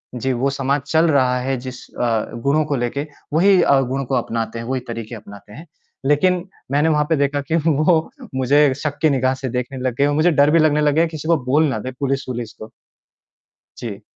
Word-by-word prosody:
जी, 130 +2 -1
वो 130 +3 0
समाज 140 0 -1
चल 160 +2 +3
रहा 130 -3 +2
है 135 +1 -1
जिस 125 0 -8
अ, 115 -3 -1
गुणों 150 +3 +2
को 145 - -1
लेके, 135 +4 -2 0.3
वही 185 +3 +5
अ, 140 -4 +4
गुणों 135 +1 -2
को 130 +1 -1
अपनाते 115 -1 -2
हैं, 115 - -6
वही 130 +1 -2
तरीके 115 0 -6
अपनाते 100 0 -13
हैं। 160 +8 -11 0.4
लेकिन, 175 +5 +2 0.3
मैंने 150 +3 +2
वहाँ 150 -1 +2
पे 160 - +3
देखा 145 0 0
कि - - +3
वो 160 +2 +3 0.4
मुझे 135 +2 +3
शक 145 -2 -2
की 155 - +4
निगाह 130 -1 +1
से 130 0 -5
देखने 125 +2 -4
लग 125 -2 -2
गए 140 - +3
और 145 - +1
मुझे 165 +3 +3
डर 145 0 +4
भी 165 - +4
लगने 150 -1 +3
लग 150 -1 +2
गया 165 +2 +4
किसी 155 +1 -6
को 170 -1 +4
बोल 145 +5 +3
ना 110 - -2
दे 130 +4 -5
पुलिस-वुलिस 130 -4 -3
को। 110 - -8 1.1
जी। - - -7
140 Hz, 215 wpm, -20 LUFS, 125-150 Hz, 1.1 s, वही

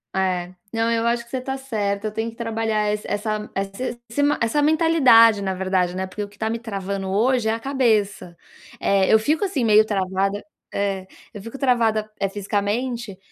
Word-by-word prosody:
É. 185 -1 -1 0.2
Não, 225 0 +1
eu 230 0 +1
acho 235 0 0
que - - -21
você 260 - -2
tá 265 +1 -4
certa, 215 -6 -2
eu - - -4
tenho 225 +2 -3
que - - -18
trabalhar 225 -2 -1
esse 210 0 -3
essa 210 +1 -2
esse 195 +5 -4
esse 285 +5 0
ma 290 +1 +2
essa 235 +6 +1
mentalidade, 290 -9 +5
na 190 -1 -1
verdade, 185 -1 0
né, 190 0 -3
porque 205 +3 -5
o 205 - -7
que 205 - -21
tá 220 +1 -1
me 230 +1 -2
travando 195 -3 -4
hoje 225 +3 +2
é - - +2
a 225 - -3
cabeça. 220 -9 0 0.4
Eh, 195 -1 +2
eu 220 - +6
fico 305 - 0
assim 330 -10 -1
meio 215 0 +6
travada 195 0 -1 0.3
É. 195 -2 -2 0.3
Eu 205 - -8
fico 230 +6 -8
travada, 230 -5 +1
eh, 195 - +1
fisicamente, 205 +2 -2
215 Hz, 200 wpm, -22 LUFS, 200-235 Hz, 0.4 s, eu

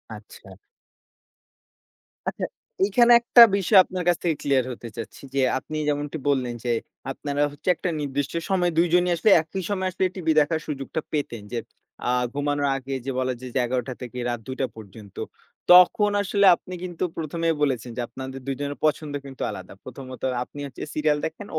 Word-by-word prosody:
আচ্ছা। 105 -2 -14 1.8
আচ্ছা। - - -2 0.4
এখানে 240 +4 +4
একটা 235 0 +6
বিষয় 195 +1 +3
আপনার 185 0 -5
কাছ 175 -1 +4
থেকে 165 -3 +1
ক্লিয়ার 135 -3 +2
হতে 120 -1 -8
চাচ্ছি। 115 - -7
যে 135 - +3 0.2
আপনি 155 +3 -6
যেমনটি 145 +1 -1
বললেন 130 -4 0
যে 120 - 0 0.4
আপনারা 145 +1 -3
হচ্ছে 145 +5 -4
একটা 180 - -3
নির্দিষ্ট 140 0 -2 0.2
সময়ে 180 -2 +2
২ 170 +1 +5
জনই 180 0 +4
আসলে 210 +6 +2
একই 175 +4 -5
সময়ে 190 -2 0
আসলে 190 +1 0
টিভি 165 -4 0
দেখার 160 +2 +1
সুযোগটা 145 +2 -4
পেতেন। 140 -7 -3
যে 120 - -1 0.5
আ - - +3 0.2
ঘুমানোর 145 0 0
আগে 135 0 -6
যে 135 - -1
বলা 130 0 0
যায় 130 -1 -8
যে 130 - +3
১১ঃ০০ 125 +1 0
টা 130 - -3
থেকে 125 0 -7
রাত 120 - -2
২ঃ০০ 130 - -4
টা 130 - +3
পর্যন্ত। 105 -1 -12 0.6
তখন 180 +3 +7
আসলে 200 0 +2
আপনি 185 - -11
কিন্তু 175 -2 -4
১ম 165 0 -4
এই 165 - +2
বলেছেন 125 -5 0
যে, 125 - 0
আপনাদের 130 0 -7
২ 135 - 0
জনের 145 0 -3
পছন্দ 155 -1 0
কিন্তু 135 -2 -10
আলাদা। 95 0 -9
প্রথমত 130 0 -9 0.2
আপনি 145 - -12
হচ্ছে 135 - -8
সিরিয়াল 150 -1 +2
দেখেন, 165 +6 -6
145 Hz, 180 wpm, -24 LUFS, 130-175 Hz, 1.8 s, তখন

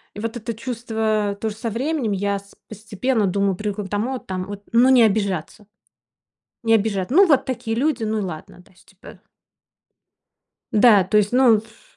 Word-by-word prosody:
вот 225 +3 -4
это 230 +1 -5
чувство 220 -3 -2
тоже 220 -2 -3
со 230 +1 -4
временем 260 0 -2
я 200 +1 -1
с 200 0 -15
постепенно 220 +2 -2
думаю 195 0 0
привыкла 210 +1 -4
к 190 - -9
тому, 235 +6 -2
там 185 -4 -5
вот, 205 +1 -8
ну, 240 +3 +5
не 260 -2 +6
обижаться, 200 -3 0 1.0
не 225 0 +3
обижа 200 -3 0
Ну, 380 +9 +6
вот 290 -6 +3
такие 225 -3 -4
люди, 270 -2 0
ну 220 0 -1
и - - -1
ладно, 175 -4 -8
да, 180 - -16
то - - -25
есть, 180 - -25
типа. 190 - -15 1.5
Да, 210 -2 +6
то 190 +3 +1
есть, 210 -1 +2
ну, 250 -3 +5
ф 220 +1 -12
215 Hz, 180 wpm, -21 LUFS, 200-235 Hz, 1.5 s, не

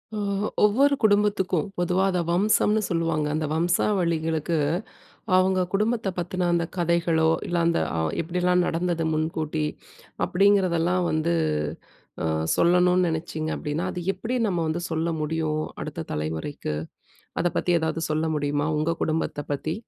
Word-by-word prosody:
ஓ - - -2 0.3
ஒ - - 0 0.2
ஒவ்வொரு 270 +7 +4
குடும்பத்துக்கும், 205 -5 +2
பொதுவா 180 +2 +2
அத 180 - 0
வம்சம்ன்னு 210 +4 +3
சொல்லுவாங்க. 165 -3 0
அந்த 155 0 -1
வம்சாவளிகளுக்கு, 165 -1 +1 0.8
அவுங்க 185 0 +3
குடும்பத்தை 215 +1 +1
பத்தின 180 0 -1
அந்த 170 -1 +1
கதைகளோ, 170 -2 +2 0.2
இல்ல 175 - -1
அந்த 170 - +2 0.2
அ - - +1 0.2
எப்டியெல்லாம் 180 +2 +1
நடந்தது 170 0 -1
முன்கூட்டி, 155 0 -1 0.6
அப்டிங்கிறதெல்லாம் 180 -2 +2
வந்து, 160 +2 +1 0.9
ஆ - - 0 0.3
சொல்லணும்னு 180 +1 +4
நெனச்சீங்க 160 -1 -3
அப்டின்னா, 155 +3 -3
அது 180 -2 -5
எப்டி 250 +3 -2
நம்ம 180 -4 0
வந்து 160 +2 -2
சொல்ல 160 +1 0
முடியும்? 155 0 -1 0.2
அடுத்த - - -5
தலைமுறைக்கு. 80 - -3 0.7
அத 175 - +1
பத்தி 180 - +1
ஏதாவது 160 0 -2
சொல்ல 155 +1 0
முடியுமா, 145 +1 0
உங்க 160 +2 0
குடும்பத்தை 155 -2 -2
பத்தி? 155 +3 -2
170 Hz, 130 wpm, -25 LUFS, 160-185 Hz, 0.9 s, ஒவ்வொரு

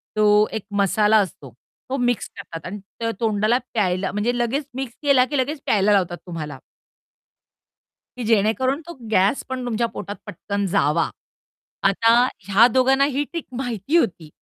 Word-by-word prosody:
तो 210 0 +5
एक 220 - -4 0.2
मसाला 210 +2 +3
असतो 180 -9 -2 0.4
तो 270 - -1
मिक्स 245 -2 0
करतात 165 -5 -8
आणि 200 +3 -6 0.2
त 230 0 0
तोंडाला 215 +1 +2 0.2
प्यायला 190 -3 0
म्हणजे 225 +4 -1
लगेच 245 +5 -1
मिक्स 265 -3 -5
केला 275 -3 +5
की 290 +2 -3
लगेच 275 +3 -1
प्यायला 205 0 +3
लावतात 180 -3 +1
तुम्हाला 160 -5 -6 1.6
की 250 - -4
जेणेकरून 230 +6 +1
तो 345 - -7 0.2
गॅस 195 +5 +2
पण 260 -1 -4
तुमच्या 235 -1 0
पोटात 205 - -6
पटकन 200 0 -3
जावा. 165 -3 +2 0.8
आता 225 +4 +3 0.4
ह्या 205 +4 +6
दोघांना 265 +2 +4
ही 285 0 0
ट्रिक 335 +3 -6
माहिती 245 - -1
होती. 175 - -1
220 Hz, 150 wpm, -22 LUFS, 200-255 Hz, 1.6 s, ह्या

